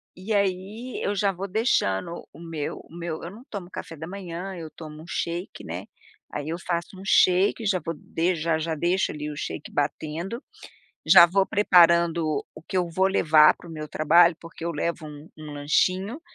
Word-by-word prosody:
e 190 +5 -4
aí 200 +5 -2
eu 205 - 0
já 200 -1 +2
vou 195 +1 -5
deixando 170 - 0
o 145 - -14
meu 165 -3 -5
o - - -19
meu 170 -2 -5
eu 170 - -6
não 220 +5 -13
tomo 190 -4 -6
café 165 - -7
da 160 +1 -7
manhã 185 0 -6
eu 160 -2 -7
tomo 155 -1 -10
um 165 - -13
shake 170 +2 -4
né, - - -6 0.5
aí 145 +1 -4
eu 165 - -2
faço 175 +1 -3
um - - -9
shake, 195 +4 +4
já 195 -3 +2
vou 165 +1 -3 0.4
já 160 0 0
já 160 0 -2
deixo 175 +5 +1
ali 150 0 -5
o - - -7 0.4
batendo, 160 - -3 0.6
já 175 -3 +9
vou 190 +3 +2
preparando 170 -6 +4
o 155 - -12
que 185 - -3
eu 175 -2 0
vou 185 +3 +2
levar 155 -5 +5
para - - -14
o - - -9
meu 155 -1 -6
trabalho 170 +3 +5
porque 165 0 -11
eu 170 - -1
levo 165 +1 -3
um 150 +1 -11
um 155 -1 -9
lanchinho, 185 - 0
170 Hz, 190 wpm, -25 LUFS, 155-190 Hz, 0.6 s, já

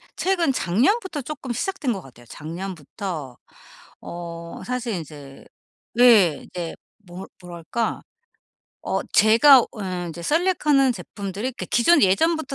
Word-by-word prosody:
최근 345 -7 +1
작년부터 290 - 0
쪼끔 270 -2 -6
시작된 310 - -2
것 195 - -6
같아요. 120 -5 -16
작년부터 160 -3 -7 0.6
어 170 -1 -8
사실 250 -2 -3
인제 145 -4 -10 0.6
예. 210 -11 +5
이제 175 -2 -6 0.3
뭐 180 +2 -9 0.2
뭐랄까? 180 +6 -4 0.8
어 - - -2
제가 235 +6 +7
어 - - -3 0.4
인제 170 +1 -8
셀렉하는 300 - +2
제품들이 205 +2 -5
그 - - -7
기존 290 +9 +4
예전부터 300 - +2
210 Hz, 250 characters per minute, -23 LUFS, 170-275 Hz, 0.8 s, 제가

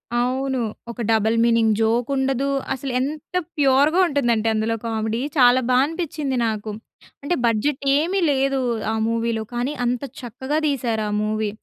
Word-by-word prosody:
అవును. 260 +2 0 0.3
ఒక 235 - -7
double 220 +1 +2
meaning 230 -2 +3
joke 230 +3 +1
ఉండదు. 270 0 0 0.3
అసలు 265 0 -5
ఎంత 300 +6 -4 0.2
ప్యూర్‌గా 285 +5 +4
ఉంటుందంటే 240 -7 +1
అందులో 220 +1 0
కామెడీ 220 +1 -2 0.2
చాలా 250 0 +6
బాగా 255 +1 +4
అనిపించింది 305 -5 -3
నాకు. 215 0 -3 0.5
అంటే 350 +5 0
బడ్జెట్ 235 +5 0
ఏమీ 355 +6 0
లేదు 275 0 +1 0.3
ఆ - - -1 0.2
మూవీలో. 230 -1 -1
కానీ 245 +5 -1
అంత 245 +2 -1 0.2
చక్కగా 260 +5 -3
తీశారు 235 -6 -1
ఆ - - -3
మూవీ. 215 0 -1
250 Hz, 145 wpm, -22 LUFS, 225-275 Hz, 0.5 s, చాలా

